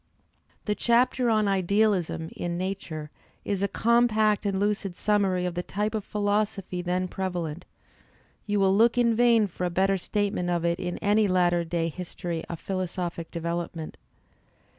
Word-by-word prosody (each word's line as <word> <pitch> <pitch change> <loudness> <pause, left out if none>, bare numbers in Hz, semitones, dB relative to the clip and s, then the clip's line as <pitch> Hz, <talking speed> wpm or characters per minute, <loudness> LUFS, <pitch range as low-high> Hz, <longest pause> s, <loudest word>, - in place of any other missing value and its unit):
The 210 - +1
chapter 245 +2 +2
on 215 -2 +3
"Idealism" 195 -3 +1
in 175 0 -3
"Nature" 170 -5 -4 0.3
is 200 -2 -1
a 200 - +2
compact 220 -2 +2
and 195 -1 0
lucid 205 -2 -1
summary 195 -4 +1
of 180 - -2
the 175 - -2
type 210 +4 -2
of 215 -2 -2
philosophy 205 -3 -1
then 180 +1 -1
prevalent; 180 -3 -4 0.8
you 205 -1 +1
will 195 0 +4
look 230 +3 +4
in 235 -1 +4
vain 230 -2 +4
for 180 -2 -6
a 180 - +1
better 195 +2 +1
statement 200 -2 -1
of 170 -1 0
it 170 +1 +1
in 180 -1 -3
any 210 +1 +3
latter 175 -2 +2
day 165 0 -1
history 170 0 -5
of 170 - -6
philosophic 180 -3 -4
development. 170 -1 -4
190 Hz, 155 wpm, -26 LUFS, 175-210 Hz, 0.8 s, will